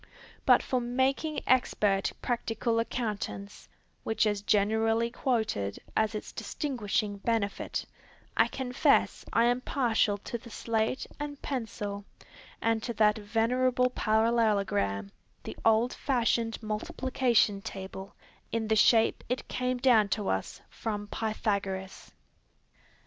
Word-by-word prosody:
But - - +6
for 255 -1 0
making 265 +5 0
expert 210 -6 +2
practical 230 -1 0
accountants, 215 -3 -4 0.3
which 220 0 +1
is 205 -1 0
generally 220 +3 +2
quoted 220 - -1 0.2
as 220 0 +1
its 215 - -5
distinguishing 215 -7 -2
benefit, 210 -1 -1 0.5
I - - +5
confess 255 -1 +1
I 230 - +4
am 245 +1 +2
partial 225 -6 +1
to 235 +3 -6
the 235 - -13
slate 225 +2 -1
and 290 -1 -5
pencil, 210 -6 -4 0.6
and 225 -1 +2
to 235 +1 -4
that 210 0 +3
venerable 250 +4 +1
parallelogram, 210 - +1 0.3
the - - -7
old 225 +2 +3
fashioned 235 -4 0
Multiplication 220 -1 +1
Table, 190 0 -7 0.4
in 225 -1 -1
the 220 - +4
shape 225 +1 +4
it 250 - -2
came 255 0 -1
down 240 -5 +4
to 210 - -2
us 95 0 -2
from 205 -2 -4
Pythagoras. 200 -4 -3
225 Hz, 115 wpm, -29 LUFS, 205-245 Hz, 0.6 s, But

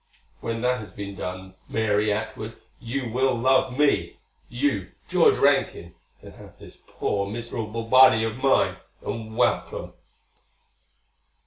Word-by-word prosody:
When 115 0 -4
that 125 +1 +1
has 105 - -9
been 100 -1 -7
done, 95 0 -6 0.2
Mary 105 -1 +1
Atwood, 110 +1 -4 0.2
you 120 0 -4
will 130 +2 +1
love 130 +1 +2
me. 150 -1 +1 0.3
You, 120 -6 -1 0.2
George - - +4
Rankin, 85 0 +1 0.3
can - - -13
have - - -15
this - - -14
poor 100 -1 -2
miserable 115 0 -5
body 115 -1 +6
of 115 +3 -3
mine, 135 -1 +3 0.3
and 110 -1 -5
welcome." - - 0
115 Hz, 125 wpm, -25 LUFS, 105-125 Hz, 0.3 s, body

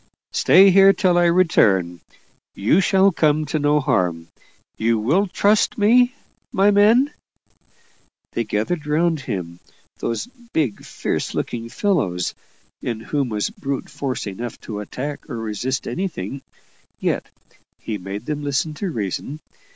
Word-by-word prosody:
Stay 195 +2 +6
here 195 +1 +7
till 185 -3 +2
I 175 0 +4
return 100 - +3 0.5
you 115 - +3
shall 195 +1 +4
come 155 -2 +2
to 150 +2 -2
no 145 +1 +3
harm. 85 - 0 0.5
You 115 +1 +1
will 155 - +2
trust 205 +3 +2
me, 245 +5 +4 0.4
my 200 +2 +4
men?" 225 +8 +4 1.2
They 115 - -1
gathered 130 +10 -2
round 160 +1 +1
him 90 -9 -5 0.4
those 115 - -2 0.3
big, 135 -10 -1
fierce - - -3
looking 115 -1 -3
fellows, 110 - 0 0.5
in 115 -2 -3
whom 135 +3 -2
was 105 -2 -2
brute 135 -1 -5
force 135 -3 -3
enough 110 +4 -6
to 105 -2 -6
attack 135 +8 -6
or 115 - -4
resist 115 +4 -3
anything 140 - -4 0.6
yet - - -1 0.5
he 105 -2 -5
made 100 +4 -6
them 150 -1 -3
listen 145 +2 -1
to 190 +5 -4
reason. 120 - -4
145 Hz, 135 wpm, -21 LUFS, 110-180 Hz, 1.2 s, here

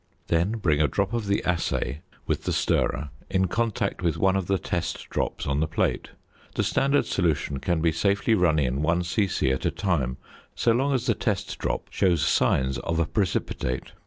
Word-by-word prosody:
Then 85 +5 +2
bring 80 -10 +1
a 75 - +4
drop 100 +5 -1
of 115 -3 -2
the 100 0 +1
assay 85 -4 -1 0.2
with - - -2
the - - 0
stirrer 70 +2 0 0.2
in 95 0 +2
contact 110 -2 -1
with 85 -4 0
one 95 0 +3
of 95 -3 -1
the 95 - +2
test 85 0 -3
drops - - -2
on 70 0 0
the 80 - +1
plate. 80 - -1 0.5
The - - +1
standard 140 +2 +2 0.6
can 85 -3 0
be 85 - +4
safely 100 +6 +1
run 90 -6 +3
in 65 -1 0
1 85 +3 +1
c.c. 85 -5 +1
at 65 - -2
a - - +2
time, 70 -10 -1 0.4
so 115 - +2
long 135 +4 +2
as 125 -1 -1
the 120 - +3
test 105 -3 -2
drop - - -2
shows 85 -6 +2
signs 65 0 +2
of 85 - -2
a 85 - +2
precipitate. 75 -9 -2
90 Hz, 190 wpm, -26 LUFS, 75-100 Hz, 0.6 s, a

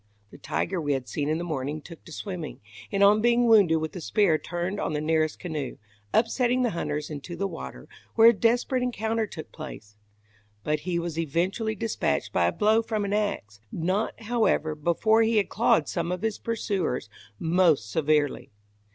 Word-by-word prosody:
The - - -13
tiger 180 -1 -2
we 145 -2 0
had 130 -2 -3
seen 145 -1 -2
in 155 - +1
the 170 - -3
morning 150 -2 -3
took 165 +2 -13
to 170 - -12
swimming, 175 -2 -6 0.3
and 200 0 +2
on 210 +2 +6
being 240 +1 +4
wounded 205 -8 +6
with 160 +2 -4
a 180 - -5
spear 170 -2 +2
turned 175 +3 -3
on - - -2
the 150 - 0
nearest 155 0 +1
canoe, 155 -7 -5 0.3
upsetting 245 +2 +2
the 240 - +1
hunters 150 -3 -3
into 150 +3 -6
the 200 - -2
water, 65 - -8 0.3
where 225 0 +8
a - - +4
desperate 240 +4 +1
encounter 225 -2 -1
took 160 - -9
place; 115 -9 -9 0.7
but 150 0 0
he 175 - +1
was 170 -1 -3
eventually 185 +8 -1
dispatched 225 0 -1
by - - +3
a - - +2
blow 215 +1 +3
from 220 -2 -2
an 200 - -2
ax 200 - -2
not, 190 +7 -2
however, 220 -9 +1
before 170 +9 +2
he 225 0 +2
had 205 - +2
clawed 180 -9 +2
some 170 - -2
of 180 +2 -3
his 220 -2 -1
pursuers 200 - -2 0.3
most 165 - +3
severely. 150 -1 +1
180 Hz, 185 wpm, -26 LUFS, 155-220 Hz, 0.7 s, where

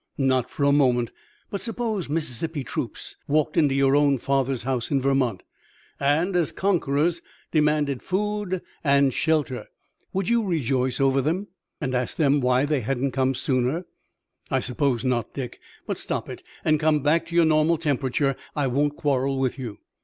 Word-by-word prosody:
"Not 130 -3 +1
for 145 - -3
a 140 - +5
moment. 125 -5 +3 0.4
But 200 - -3
suppose 225 -7 -2
Mississippi 150 0 -2
troops - - -5
walked 155 +1 +1
into 150 -5 +3
your 135 0 +4
own 145 -1 +4
father's 135 -2 0
house 125 -2 -1
in 140 - +2
Vermont, 130 -7 +1 0.6
and, 160 +7 +1
as 170 -3 +2
conquerors, 170 -3 +1 0.3
demanded 150 -3 +2
food 205 -1 -2 0.2
and 140 -2 +4
shelter! 155 -5 0 0.4
Would 190 -1 -1
you 235 0 +3
rejoice 130 - 0
over 135 0 +3
them, 175 +9 -1 0.3
and 135 -3 -2
ask 125 0 -1
them 145 -2 +3
why 125 +2 +3
they 145 -2 0
hadn't 135 +3 -1
come 130 +1 +1
sooner?" 130 +6 0 0.6
"I - - +2
suppose 130 -1 0
not, 120 -4 -1
Dick. 130 -4 -5 0.3
But, - - -3
stop - - -3
it, - - -7 0.2
and 155 -1 +3
come 155 -2 +2
back 165 +3 +2
to 170 - -6
your 170 -1 +6
normal 155 +1 +3
temperature. 140 -2 0 0.2
I 145 - +1
won't 145 +3 0
quarrel 135 -1 0
with 135 0 -1
you." 115 -5 -6
140 Hz, 165 wpm, -25 LUFS, 130-160 Hz, 0.6 s, your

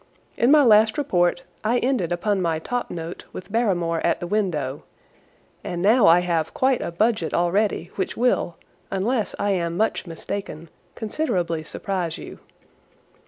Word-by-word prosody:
In 240 - +2
my 295 0 +7
last 220 -2 +5
report 180 -4 +1 0.2
I 230 +3 +2
ended 245 -9 0
upon 190 +3 0
my 165 -2 0
top 245 +10 -3
note 165 0 -6
with 185 - -9
Barrymore 175 -8 +1
at 170 - +1
the - - -4
window, 170 -9 -1 0.8
and 175 - -4
now 215 +5 +5
I 170 +2 +7
have 165 -3 -1
quite 260 -1 +2
a - - -3
budget 205 -1 0
already 175 0 +1
which - - -2
will, 240 -8 +1 0.3
unless 215 +4 -1
I 205 0 0
am 170 -3 -1
much 220 -2 0
mistaken, 165 -1 -6 0.3
considerably 180 - -2
surprise 175 0 -3
you. - - -10
190 Hz, 150 wpm, -23 LUFS, 170-220 Hz, 0.8 s, my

